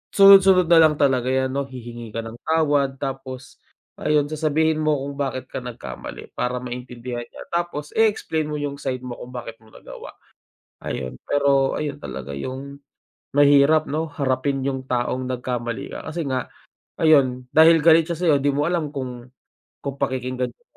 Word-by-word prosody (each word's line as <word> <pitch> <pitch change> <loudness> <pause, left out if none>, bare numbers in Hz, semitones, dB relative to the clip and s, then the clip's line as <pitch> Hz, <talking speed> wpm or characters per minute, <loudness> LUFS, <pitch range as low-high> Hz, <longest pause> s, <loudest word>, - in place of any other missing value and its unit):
sunod 195 0 +10
sunod 185 -3 +3
na 165 - +8
lang 155 -2 +5
talaga 130 -4 +2
yan 130 0 +1
no 140 0 -2
hihingi 120 -3 -9
ka 115 - -2
ng 115 +1 -9
tawad, 145 -4 +2
tapos 135 -1 -6 0.4
ayun 150 -1 +2
sasabihin 155 0 +1
mo 155 -1 +2
kung 140 0 -7
bakit 130 -2 -3
ka - - -3
nagkamali. 120 - -8
Para 125 0 -3
maintindihan 125 -1 -6
niya, - - -11
tapos 170 -4 -3
eexplain 205 -8 +1
mo 150 - -4
yung 145 -1 -4
side 130 -2 -3
mo 125 -1 -7
kung 125 +1 -10
bakit 115 -2 -7
mo 110 - -22
nagawa, - - -11 0.7
ayun 65 -1 -4
pero 140 -1 +2
ayun 145 -2 -3
talaga 70 - -8
yung 135 - -6 0.6
mahirap 145 +2 +5
no, 160 +2 -1
harapin 135 0 0
yung 130 -1 -3
taong 125 +1 -1
nagkamali 125 -2 -4
ka - - -7
kasi 160 +1 -3
nga 130 -3 -2 0.5
ayon 130 -5 +3
dahil 165 +1 +7
galit 165 +1 +6
siya 170 +1 -4
sayo 170 -4 +3
di 145 - +3
mo 145 +2 0
alam 170 -4 -1
kung 125 -3 -7 0.5
kung 140 -1 -4
pakikinggan 130 -1 -2
ka 240 - -38
140 Hz, 170 wpm, -22 LUFS, 125-155 Hz, 0.7 s, sunod